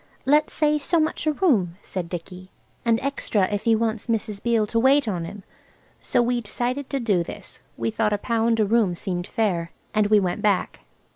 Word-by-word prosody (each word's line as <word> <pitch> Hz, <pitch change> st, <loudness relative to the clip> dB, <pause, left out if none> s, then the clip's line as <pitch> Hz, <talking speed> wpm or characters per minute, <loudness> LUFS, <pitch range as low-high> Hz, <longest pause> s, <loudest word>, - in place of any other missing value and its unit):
"Let's 295 Hz, +3 st, +3 dB
say 300 Hz, -1 st, +2 dB
so 335 Hz, +4 st, +1 dB
much 315 Hz, 0 st, -1 dB
a -, -, +4 dB
room," 220 Hz, -, +1 dB
said 180 Hz, -3 st, -5 dB
Dicky, 180 Hz, +2 st, -7 dB, 0.3 s
"and 230 Hz, -1 st, +2 dB
extra 270 Hz, -7 st, 0 dB
if 205 Hz, -, -2 dB
he 225 Hz, -1 st, +5 dB
wants 220 Hz, -1 st, -1 dB
Mrs. 215 Hz, -3 st, -2 dB
Beale 230 Hz, -2 st, +2 dB
to 230 Hz, +2 st, 0 dB
wait 270 Hz, +2 st, +4 dB
on 175 Hz, -5 st, -2 dB
him." 200 Hz, +3 st, -9 dB, 0.6 s
So 240 Hz, -, +2 dB
we 240 Hz, 0 st, 0 dB
decided 245 Hz, +5 st, -3 dB
to 275 Hz, -, -1 dB
do 205 Hz, -8 st, +1 dB
this. -, -, -10 dB, 0.2 s
We -, -, -1 dB
thought 215 Hz, -1 st, 0 dB
a 205 Hz, -, +1 dB
pound 230 Hz, +1 st, +1 dB
a 215 Hz, -, +4 dB
room 210 Hz, -4 st, +2 dB
seemed 175 Hz, +1 st, -4 dB
fair. 180 Hz, -7 st, -1 dB, 0.2 s
And 215 Hz, -1 st, +3 dB
we 210 Hz, 0 st, +5 dB
went 180 Hz, -3 st, -2 dB
back. 205 Hz, -3 st, 0 dB
220 Hz, 200 wpm, -24 LUFS, 195-245 Hz, 0.6 s, he